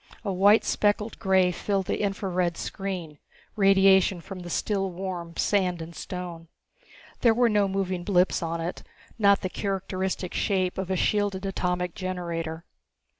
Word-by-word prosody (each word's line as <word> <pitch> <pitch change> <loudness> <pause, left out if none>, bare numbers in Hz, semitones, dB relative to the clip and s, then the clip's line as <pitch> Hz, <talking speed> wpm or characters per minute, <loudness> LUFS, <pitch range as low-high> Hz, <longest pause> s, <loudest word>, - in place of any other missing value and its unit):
A 200 - -1
white 200 +4 +5
speckled 210 +1 0
grey 190 -1 +3
filled 195 +2 -1
the - - -2
infra 200 0 -1
red 175 -2 0
screen, 180 -7 -5 0.4
radiation 195 -2 +5
from 185 +2 -8
the 175 -1 -8
still 195 +2 -1
warm 175 -2 -6
sand 185 -4 +1
and 165 +1 -8
stone. 170 0 -6 0.7
There 230 -2 +4
were 240 0 +4
no 205 -2 +3
moving 190 -2 -2
blips 185 -1 +2
on 165 0 -2
it, 165 +2 -4 0.4
not 200 -1 +5
the 185 - -1
characteristic 190 -2 -3
shape 185 -3 0
of 190 -1 -3
a 190 - +1
shielded 200 0 0
atomic 180 -2 -1
generator. 170 -3 -4
190 Hz, 150 wpm, -26 LUFS, 175-195 Hz, 0.7 s, white